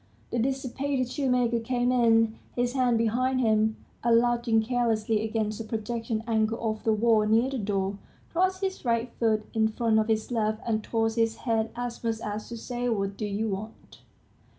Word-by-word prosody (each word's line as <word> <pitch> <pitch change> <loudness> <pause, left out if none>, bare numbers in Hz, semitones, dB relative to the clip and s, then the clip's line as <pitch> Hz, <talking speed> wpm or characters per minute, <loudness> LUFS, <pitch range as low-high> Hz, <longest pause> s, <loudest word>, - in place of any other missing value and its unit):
The 240 - 0
dissipated 265 +1 -1
shoemaker 250 -4 +1
came 245 +1 0
in, 225 -2 +4 0.2
his 245 0 0
hands 250 -3 +2
behind 250 +3 +1
him, 220 -2 +2 0.3
and 230 -1 +5
lounging 235 -1 +2
carelessly 225 -2 +1
against 220 -1 -2
a - - -4
projecting 225 0 -3
angle 225 -1 +1
of 220 -2 -2
the 225 - +2
wall, 215 0 +3
near 230 +5 +3
the 265 - -2
door, 195 -1 -1 0.3
crossed 375 +2 +1
his 380 -1 -2
right 235 -1 0
foot 215 -2 +2
in 220 -1 +3
front 220 0 +1
of 215 - +1
his 220 +1 0
left, 215 -2 0
and 220 -2 0
tossed 225 0 0
his 225 -1 +2
head, 225 -2 +1
as 245 0 -5
much 225 -1 -1
as 210 0 -5
to 235 - -6
say, 245 +1 -3
"What 195 -3 -1
do 210 +1 -3
you 210 +2 -1
want?" 210 +3 -7
225 Hz, 180 wpm, -27 LUFS, 220-245 Hz, 0.3 s, and